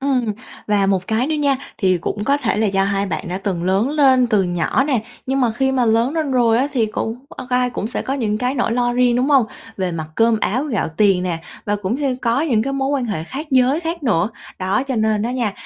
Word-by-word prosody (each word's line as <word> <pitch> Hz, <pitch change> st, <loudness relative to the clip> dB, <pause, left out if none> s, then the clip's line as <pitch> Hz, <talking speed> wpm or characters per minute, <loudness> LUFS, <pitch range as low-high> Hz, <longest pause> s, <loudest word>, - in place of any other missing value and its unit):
Ừm, 265 Hz, -3 st, +1 dB, 0.4 s
và 205 Hz, -2 st, +2 dB
một 190 Hz, -2 st, 0 dB
cái 225 Hz, +4 st, 0 dB
nữa 315 Hz, -, -1 dB
nha, 285 Hz, -2 st, +2 dB, 0.2 s
thì 185 Hz, -2 st, +2 dB
cũng 205 Hz, +5 st, -3 dB
có 280 Hz, +3 st, +3 dB
thể 235 Hz, -7 st, -1 dB
là 220 Hz, +1 st, +2 dB
do 195 Hz, -1 st, +1 dB
hai 200 Hz, 0 st, 0 dB
bạn 190 Hz, 0 st, -4 dB
đã 180 Hz, +1 st, -3 dB
từng 190 Hz, -4 st, -3 dB
lớn 190 Hz, +6 st, +2 dB
lên 265 Hz, -4 st, +4 dB
từ 215 Hz, -4 st, +2 dB
nhỏ 175 Hz, +8 st, 0 dB
nè, 265 Hz, -7 st, 0 dB, 0.2 s
nhưng 270 Hz, +1 st, 0 dB
mà 245 Hz, -3 st, +3 dB
khi 265 Hz, +3 st, 0 dB
mà 255 Hz, -2 st, +2 dB
lớn 230 Hz, +4 st, +2 dB
lên 315 Hz, -3 st, -1 dB
rồi 235 Hz, -3 st, +3 dB
á, 265 Hz, -, +2 dB
thì 230 Hz, -5 st, +2 dB
cũng, 225 Hz, +1 st, -3 dB
ờ, -, -, -9 dB
ai 250 Hz, 0 st, +2 dB
cũng 215 Hz, -, -3 dB
sẽ 240 Hz, -, -3 dB
có 270 Hz, -, -2 dB
những 215 Hz, -6 st, -1 dB
cái 250 Hz, +3 st, -1 dB
nỗi 240 Hz, -3 st, 0 dB
lo 245 Hz, 0 st, +1 dB
riêng, 245 Hz, -1 st, +3 dB
đúng 250 Hz, +2 st, +1 dB
hông? 270 Hz, -6 st, +4 dB, 0.3 s
Về 185 Hz, -2 st, -2 dB
mặt 160 Hz, -2 st, -4 dB
cơm 225 Hz, +2 st, +3 dB
áo 250 Hz, +9 st, 0 dB
gạo 245 Hz, -9 st, -1 dB
tiền 195 Hz, -3 st, +3 dB
nè, 175 Hz, -3 st, -2 dB, 0.3 s
và 205 Hz, 0 st, 0 dB
cũng 205 Hz, +3 st, -2 dB
thêm 275 Hz, -3 st, -1 dB
có 245 Hz, 0 st, 0 dB
những 245 Hz, -9 st, +1 dB
cái 275 Hz, -, -2 dB
mối 270 Hz, 0 st, -1 dB
quan 280 Hz, -3 st, 0 dB
hệ 200 Hz, -9 st, -3 dB
khác 285 Hz, -, -6 dB
giới 260 Hz, +3 st, +3 dB
khác 335 Hz, 0 st, -4 dB
nữa. 210 Hz, -6 st, +1 dB, 0.3 s
Đó, 190 Hz, +7 st, 0 dB
cho 260 Hz, -, -1 dB
nên 215 Hz, -1 st, +1 dB
á 235 Hz, -, -1 dB
nha, 240 Hz, -5 st, -1 dB
235 Hz, 260 wpm, -19 LUFS, 205-265 Hz, 0.4 s, lên